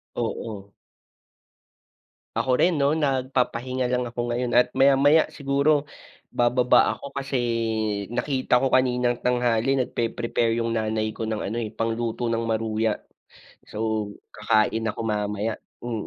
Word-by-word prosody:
Oo. 110 -3 -4 1.7
Ako 130 - +1
rin 175 0 +4
'no? 140 +1 +3
Nagpapahinga 130 -3 0
lang 125 0 +1
ako 120 0 -7
ngayon, 120 +1 -1
at 125 - +5
maya-maya 140 +3 +5
siguro 140 +1 +2 0.4
bababa 125 +1 +3
ako. - - -11
Kasi 140 0 -2 0.8
nakita 130 -1 +1
ko 135 - +2
kaninang 125 -2 +2
tanghali 125 +1 +2
nagpre 115 -2 -1
-prepare 115 -1 0
yung 115 0 -1
nanay 110 0 -1
ko - - -3
ng 110 -1 -2
ano, 110 +4 -3
eh, 110 -3 -3
pangluto 115 +1 -2
ng 115 0 0
maruya. 110 -1 0 0.7
So - - -12 0.6
kakain 110 +1 +1
ako 110 - -3
mamaya, 105 0 -1 0.3
mm. 115 -3 -4
120 Hz, 125 wpm, -24 LUFS, 110-130 Hz, 1.7 s, at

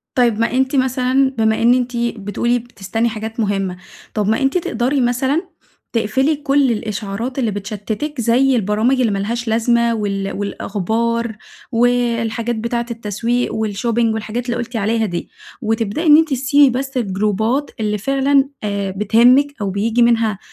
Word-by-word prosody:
طيب، 235 -4 +2
ما 230 - +1
أنتِ 265 +2 +1
مثلًا، 260 0 +2
بما 220 0 +2
إن 235 +1 +5
أنتِ 250 -1 -1
بتقولي 235 +1 -1
بتستني 230 0 -3
حاجات 220 +1 -6
مهمة، 195 -4 -1 0.4
طيب 210 -2 -1
ما 220 +4 +1
أنتِ 270 +5 +2
تقدري 260 -3 0
مثلًا، 260 +5 +1 0.5
تقفلي 260 +7 +1
كل 280 -2 +2
الإشعارات 220 +3 -4
اللي 230 -4 0
بتشتتِك؛ 215 +8 -4
زي 250 +3 +3
البرامج 220 +4 +1
اللي 230 -4 +2
ما 200 - -1
لهاش 235 +4 -3
لازمة 235 +1 +2
وال 195 -2 -2
والأخبار 220 +3 -2 0.4
والحاجات 235 -1 +1
بتاعة 235 +2 -2
التسويق 230 +2 -2
و 220 0 -1
الshopping 225 +2 0
والحاجات 220 +2 -4
اللي 240 -1 -2
قُلتي 235 0 -4
عليها 220 +2 +1
دي. 175 -4 -4 0.3
وتبدئي 225 +5 -1
إن 300 -1 +8
أنتِ 320 0 +3
تسيبي 275 +1 +4
بس 270 0 -4
الجروبات 220 +5 0
اللي 210 -1 0
فعلًا، 275 +4 +2
آآ 200 -2 -2
بتهمك 235 +8 +4
أو 200 - -1
بييجي 220 +5 0
منها 225 -4 +2
230 Hz, 150 wpm, -18 LUFS, 215-250 Hz, 0.5 s, إن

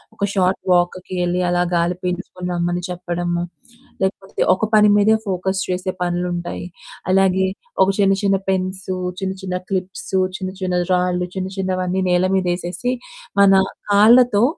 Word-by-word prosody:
ఒక 200 - -5
షార్ట్ 185 -1 +1
వాక్‌‌కి 180 +1 +1
ఎళ్లి 180 +1 0
అలా 175 0 +2
గాలి 170 +1 +1
పీల్చుకొని 180 0 -4
రమ్మని 175 0 -1
చెప్పడము. 175 -1 -2 0.6
లేకపోతే 190 0 -2
ఒక 185 - -4
పని 210 -1 +6
మీదే 205 +2 +4
ఫోకస్ 190 0 -1
చేసే 185 +1 -1
పనులు 175 0 -1
ఉంటాయి. 175 0 -5 0.5
అలాగే 190 0 +3 0.4
ఒక 190 - +2
చిన్న 195 -1 +4
చిన్న 195 -1 +3
పెన్సు, 185 0 -2 0.3
చిన్న 190 0 -1
చిన్న 185 -1 -3 0.2
క్లిప్సు, 190 0 -2 0.2
చిన్న 185 -2 -4
చిన్న 180 -1 -1 0.2
రాళ్ళు, 180 0 0
చిన్న 185 0 -2
చిన్నవన్నీ 185 -1 -1
నేల 180 +1 +3
మీదేసేసి. 180 +5 -1 0.5
మన 195 -1 +7 0.4
కాళ్ళతో, 220 +1 +6
185 Hz, 140 wpm, -20 LUFS, 180-190 Hz, 0.6 s, మన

